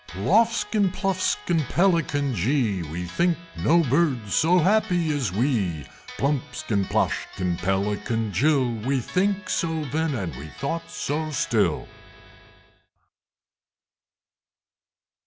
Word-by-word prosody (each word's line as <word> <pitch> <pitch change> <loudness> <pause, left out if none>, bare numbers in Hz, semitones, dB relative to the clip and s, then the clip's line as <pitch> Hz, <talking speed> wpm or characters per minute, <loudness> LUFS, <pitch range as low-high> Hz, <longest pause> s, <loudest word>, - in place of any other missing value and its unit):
Ploffskin, 210 - +2
Pluffskin, 185 -3 0
Pelican 165 -7 +1
jee! 110 - +1
We 85 +2 -5
think 170 - +1 0.2
no 170 +2 +4
Birds 130 - +1
so 175 +3 +4
happy 175 -4 +2
as 130 -10 -1
we! 100 - 0 0.3
Plumpskin, 135 -6 -1
Ploshkin, 90 -1 -1
Pelican 105 +3 -1
jill! 135 - +2
We 135 +2 +1
think 190 - -1
so 160 -4 -1
then, 160 -1 0
and 90 - -4
we 70 +4 -8
thought 140 - -4
so 145 - -3
still! 150 - 0
140 Hz, 100 wpm, -24 LUFS, 100-170 Hz, 0.3 s, no